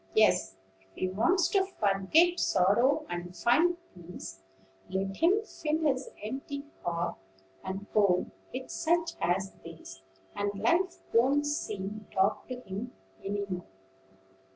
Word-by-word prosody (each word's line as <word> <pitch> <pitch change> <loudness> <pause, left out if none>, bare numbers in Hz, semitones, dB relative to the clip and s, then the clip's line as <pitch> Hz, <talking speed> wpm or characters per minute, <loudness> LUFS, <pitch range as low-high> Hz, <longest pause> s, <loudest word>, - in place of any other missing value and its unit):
Yes: - - +4 0.2
if 95 0 -30
he 185 - -1
wants 315 - +3
to 390 -1 +3 0.2
forget 215 - +4
sorrow 220 +10 +3
and 175 0 -5
find 330 +9 +4 0.2
peace, 165 - -9 0.5
let 195 +1 -2
him 390 +6 +4
fill 310 -7 -2
his 270 -3 +1
empty 275 +5 -4 0.2
heart 170 0 -1 0.5
and 190 +2 -4
home 200 -4 +3 0.2
with 255 +1 -6
such 335 0 +1
as 185 +3 +1
these, 160 -13 -10 0.3
and 205 0 -1
life 345 - +1
won't 270 +5 +4
seem 210 -8 -3
dark 190 +1 +1
to 255 - -4
him 200 +3 -6 0.3
any 200 +1 -2
more." 180 -2 -5
205 Hz, 130 wpm, -30 LUFS, 185-295 Hz, 0.5 s, Yes